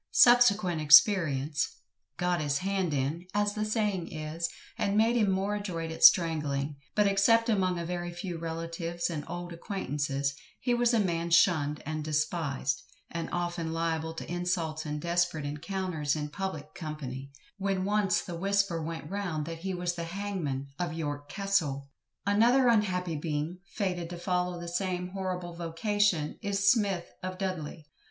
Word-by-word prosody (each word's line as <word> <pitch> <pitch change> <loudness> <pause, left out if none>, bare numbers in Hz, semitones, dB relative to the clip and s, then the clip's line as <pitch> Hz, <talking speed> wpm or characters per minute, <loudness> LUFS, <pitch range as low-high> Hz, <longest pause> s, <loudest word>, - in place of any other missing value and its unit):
Subsequent 215 -9 +5
experience 150 -2 +5 0.4
"got 180 -2 +1
his 145 -1 0
hand 190 0 -1
in" 145 +6 -2
as 205 0 +2
the 215 0 -2
saying 210 -5 -1
is, 155 +2 -3 0.3
and 200 +1 0
made 225 +2 +4
him 215 -4 +3
more 195 +2 0
adroit 175 -6 -3
at 160 - -5
strangling, 150 -4 +5 0.2
but 210 - +4
except 230 +4 +4
among 185 -4 +2
a 170 - -3
very 175 0 -3
few 175 -1 -5
relatives 165 +1 -3
and 150 -3 -3
old 175 0 -5
acquaintances, 145 -6 -2 0.3
he 245 -1 +1
was 240 0 +3
a - - +4
man 170 -4 0
shunned 155 -4 +3
and 155 0 -3
despised, 150 -3 -1 0.3
and 170 -1 -3
often 175 -2 -2
liable 160 -1 -1
to - - -6
insults 170 -3 -2
and 150 0 -3
desperate 170 -3 +1
encounters 155 0 -2
in 150 -1 -3
public 155 -4 -5
company, 140 -4 -6 0.3
when 195 -1 0
once 205 -2 +2
the 175 - -7
whisper 195 -1 +1
went 165 +1 -5
round 180 -6 -3
that 165 0 -6
he 190 +2 -3
was 175 0 -1
the 170 -1 -4
hangman 170 -7 -3
of 175 -3 -1
YORK 145 -2 -4
CASTLE. 165 -9 0 0.4
Another 240 +6 +4
unhappy 180 -7 +1
being, 155 +3 -3
fated 180 -5 -2
to 175 - -6
follow 180 0 -1
the 170 - -6
same 180 0 -2
horrible 180 -2 -4
vocation, 170 0 0
is 200 -1 +3
SMITH, 200 -7 +1 0.2
of 185 0 -4
Dudley. 175 -5 -4
175 Hz, 155 wpm, -29 LUFS, 155-195 Hz, 0.4 s, Subsequent